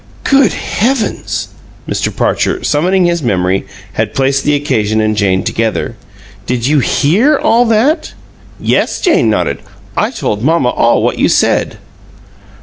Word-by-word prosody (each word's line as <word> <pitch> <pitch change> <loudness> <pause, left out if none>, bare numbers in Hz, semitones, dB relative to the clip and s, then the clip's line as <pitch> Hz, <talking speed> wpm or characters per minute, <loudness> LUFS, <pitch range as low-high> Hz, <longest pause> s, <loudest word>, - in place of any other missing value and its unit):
"Good 275 -1 +3
heavens!" 240 +1 -2 0.4
Mr. - - -1
Parcher, 370 0 -1
summoning 180 +5 +1
his 170 -1 0
memory, 95 -5 0 0.3
had - - -2
placed 135 0 +1
the 150 - +2
occasion 110 -7 0
and 110 0 +1
Jane 95 -3 +1
together. 115 +1 -2 0.5
"Did 120 -2 -1
you 150 +2 +3
HEAR 215 - +2
all 235 +2 +3
that?" 230 +8 +1 0.5
"Yes." - - 0
Jane 325 - +2
nodded. 105 - -1 0.4
"I - - +1
told 105 +1 -3
mamma 155 -3 +2
all 120 -1 +2
what - - -1
you - - +3
said." - - +1
145 Hz, 140 wpm, -13 LUFS, -, 0.5 s, Good